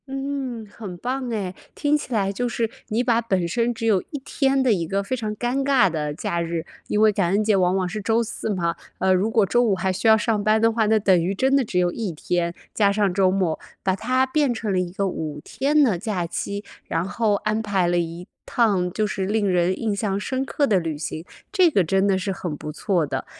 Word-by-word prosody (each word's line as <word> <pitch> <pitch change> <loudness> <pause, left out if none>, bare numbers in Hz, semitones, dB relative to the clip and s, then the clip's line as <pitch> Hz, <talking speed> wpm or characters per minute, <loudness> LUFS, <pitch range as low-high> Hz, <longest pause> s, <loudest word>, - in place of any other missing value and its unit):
嗯， 270 -4 -4
很 200 -3 -9
棒 255 +5 -3
哎， 200 -5 -3 0.2
听 290 0 +2
起 295 - -4
来 200 -4 +1
就 245 +5 -1
是 230 -1 -1 0.2
你 230 +2 0
把 235 -2 +2
本 190 -6 0
身 235 +6 0
只 230 -1 -5
有 205 -5 +3
1 290 - -5
天 270 -1 +1
的 250 -4 +4
一 170 -4 -1
个 195 +3 -1
非 230 +6 -2
常 215 -3 -4
尴 245 +5 -1
尬 270 -8 +4
的 150 -2 -2
假 170 +3 -2
日 165 -1 -3 0.2
因 210 - +1
为 215 0 +6
感 195 -4 0
恩 200 +3 +2
节 215 -1 +3
往 185 -1 +2
往 185 -1 0
是 210 +4 -4
周 225 +3 +2
四 225 - -5
嘛， 170 -4 -1 0.2
呃， 190 0 +3
如 190 +4 +2
果 220 -2 +3
周 240 +5 +2
五 215 -5 +2
还 190 +1 -1
需 195 - -1
要 220 0 +7
上 215 -1 0
班 215 +1 +3
的 225 +1 +4
话， 220 -1 +1
那 220 +1 +4
等 190 -5 +3
于 190 +3 -1
真 265 +6 +2
的 275 - +4
只 205 -5 -3
有 180 -1 +3
1 215 -3 -3
天， 170 +2 -1 0.2
加 200 -2 +3
上 200 -2 +1
周 190 0 +3
末， 185 -4 0 0.2
把 190 -1 +1
它 255 +6 +1
变 280 0 +1
成 220 -2 -3
了 185 - +1
一 180 -1 -2
个 195 +1 -1
5 155 -5 -4
天 285 +9 +2
的 220 -9 +2
假 200 -5 -2
期， 200 +4 -4 0.2
然 165 +2 -1
后 210 +1 +1
安 215 +2 -1
排 195 -5 +1
了 175 0 +1
一 170 +1 -4 0.2
趟 195 -7 +1
就 215 +4 0
是 195 -2 -2
令 210 +1 +1
人 180 0 +1
印 220 -3 -1
象 200 -1 -1
深 260 +5 -2
刻 285 +2 0
的 205 -8 +3
旅 165 -3 -3
行， 155 +1 -5 0.3
这 370 -4 +5
个 200 - +3
真 195 +4 +2
的 195 -1 +3
是 190 +1 -2
很 175 -5 -4
不 150 - -6
错 175 +1 0
的。 145 - -4
205 Hz, 255 characters per minute, -23 LUFS, 180-230 Hz, 0.3 s, 要